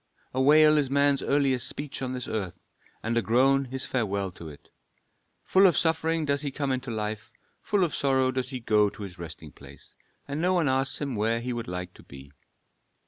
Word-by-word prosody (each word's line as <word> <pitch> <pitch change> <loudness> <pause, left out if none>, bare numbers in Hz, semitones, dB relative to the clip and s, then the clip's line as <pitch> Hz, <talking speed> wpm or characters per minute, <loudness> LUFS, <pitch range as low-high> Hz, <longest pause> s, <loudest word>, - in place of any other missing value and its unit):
"A 130 - 0
wail 150 +2 +6
is 140 -3 -1
man's 140 0 +2
earliest 135 -3 +1
speech 145 -2 -6
on 130 -1 -3
this 125 -1 -5
earth, 95 -6 -4 0.4
and 115 +1 -1
a 115 - +3
groan 135 +4 +3
his 130 +1 -4
farewell 100 -6 -2
to 85 -2 -10
it. 75 - -15 0.7
Full 190 +1 +5
of 170 - +2
suffering 160 -1 +1
does 140 -1 0
he 145 - -3
come 140 0 -2
into 130 0 -3
life, 110 0 -4 0.3
full 205 -3 +1
of 165 -6 -1
sorrow 130 +1 +2
does 130 -1 -3
he 130 -2 -5
go 105 -3 +2
to 105 - -10
his 90 -3 -9
resting 80 -2 -8
place, - - -15 0.3
and 145 +2 -3
no 180 +2 +2
one 170 -4 +2
asks 135 +1 +1
him 140 -4 -3
where 110 +2 0
he 125 +1 -4
would 120 -1 -5
like 90 0 -5
to - - -16
be. 70 +1 -13
130 Hz, 205 wpm, -27 LUFS, 110-140 Hz, 0.7 s, wail